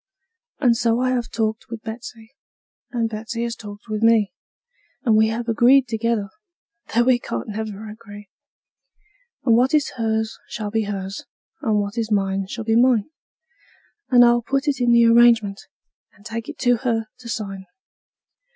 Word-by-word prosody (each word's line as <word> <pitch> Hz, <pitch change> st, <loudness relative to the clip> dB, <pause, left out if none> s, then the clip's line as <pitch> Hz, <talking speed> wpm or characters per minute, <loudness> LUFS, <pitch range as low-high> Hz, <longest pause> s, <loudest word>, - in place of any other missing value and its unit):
And 245 Hz, -5 st, +4 dB
so 230 Hz, 0 st, +1 dB
I 255 Hz, 0 st, +1 dB
have 240 Hz, -2 st, -1 dB
talked 220 Hz, -1 st, -2 dB
with 230 Hz, -1 st, -7 dB
Betsey, 225 Hz, 0 st, -9 dB, 0.6 s
and 235 Hz, -2 st, -1 dB
Betsey 225 Hz, +1 st, -5 dB
has 235 Hz, -1 st, -3 dB
talked 205 Hz, 0 st, -11 dB
with 215 Hz, -1 st, -3 dB
me, 225 Hz, -3 st, +3 dB, 0.7 s
And 230 Hz, -5 st, +3 dB
we 220 Hz, 0 st, +5 dB
have 230 Hz, +2 st, -3 dB
agreed 245 Hz, +3 st, +4 dB
together 225 Hz, -3 st, -1 dB, 0.7 s
that 240 Hz, +1 st, +4 dB
we 250 Hz, -1 st, +4 dB
can't 115 Hz, -, -5 dB
never 215 Hz, 0 st, -5 dB
agree; 210 Hz, -1 st, -11 dB, 1.2 s
And 230 Hz, -3 st, +5 dB
what 255 Hz, +5 st, +3 dB
is 295 Hz, -, +1 dB
hers 220 Hz, -1 st, -1 dB
shall 210 Hz, -2 st, -5 dB
be 220 Hz, 0 st, 0 dB
hers, 195 Hz, -1 st, -5 dB, 0.4 s
and 220 Hz, -7 st, +1 dB
what 205 Hz, +3 st, -3 dB
is 225 Hz, -1 st, -3 dB
mine 195 Hz, -1 st, 0 dB
shall 225 Hz, +3 st, -6 dB
be 225 Hz, 0 st, +2 dB
mine; 240 Hz, 0 st, +3 dB, 1.0 s
And 245 Hz, -1 st, +7 dB
I'll 240 Hz, 0 st, +4 dB
put 275 Hz, +4 st, -2 dB
it 270 Hz, -3 st, 0 dB
in 240 Hz, -1 st, +3 dB
the 235 Hz, 0 st, +6 dB
agreement, 230 Hz, -3 st, +4 dB, 0.5 s
and 205 Hz, -, -23 dB
take 225 Hz, 0 st, -5 dB
it -, -, -8 dB
to 245 Hz, -1 st, +3 dB
her 225 Hz, -2 st, -1 dB
to 240 Hz, -2 st, -10 dB
sign. 195 Hz, -4 st, -5 dB
225 Hz, 165 wpm, -22 LUFS, 215-240 Hz, 1.2 s, And